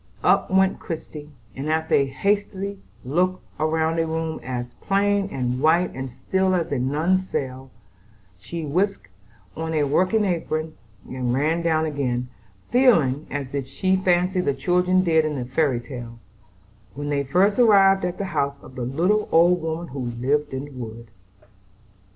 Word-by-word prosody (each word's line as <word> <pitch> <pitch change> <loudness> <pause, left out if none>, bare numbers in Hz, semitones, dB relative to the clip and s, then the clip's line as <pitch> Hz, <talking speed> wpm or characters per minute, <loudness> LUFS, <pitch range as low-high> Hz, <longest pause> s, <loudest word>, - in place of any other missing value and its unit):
Up - - +3
went 190 0 +3
Christie, 155 -3 -7 0.3
and 140 +3 -4
after 160 0 0
a 140 - +4
hasty 200 +5 -1 0.3
look 180 +7 +1 0.2
round 160 +1 +1
a 165 - +1
room 160 0 -3
as 120 -1 -5
plain 200 0 +1
and 125 -1 -2
white 170 +4 +3
and 130 0 -5
still 185 +9 0
as 170 -4 -1
a 140 - 0
nun's 165 +9 +1
cell, 130 0 -4 0.7
she 160 - -6
whisked 175 - -1 0.5
on 160 0 -3
a 150 - +2
working 185 +9 +2
apron 160 -3 -2 0.3
and 125 -1 -2
ran 155 +5 +1
down 160 -1 +1
again, 125 -5 -2 0.4
feeling, 160 - +3
as 140 -2 -4 0.2
she 190 +6 +1
fancied 180 0 +1
the 140 - +1
children 180 +6 +2
did 160 -3 +3
in 155 -1 -2
the 125 -3 -3
fairy 130 -1 +1
tale, 120 -2 -8 0.8
when 145 +1 -4
they 140 -1 0
first 190 - +2
arrived 195 -4 +5
at 180 0 -2
the 200 - -3
house 140 -2 0
of - - -13
the 130 - -6
little 175 - +1
old 175 +2 +5
woman 160 +1 -4
who 140 - -7 0.2
lived 145 +4 0
in 135 +1 -4
the 145 - -12
wood. 115 -3 -9
160 Hz, 160 wpm, -23 LUFS, 135-185 Hz, 0.8 s, arrived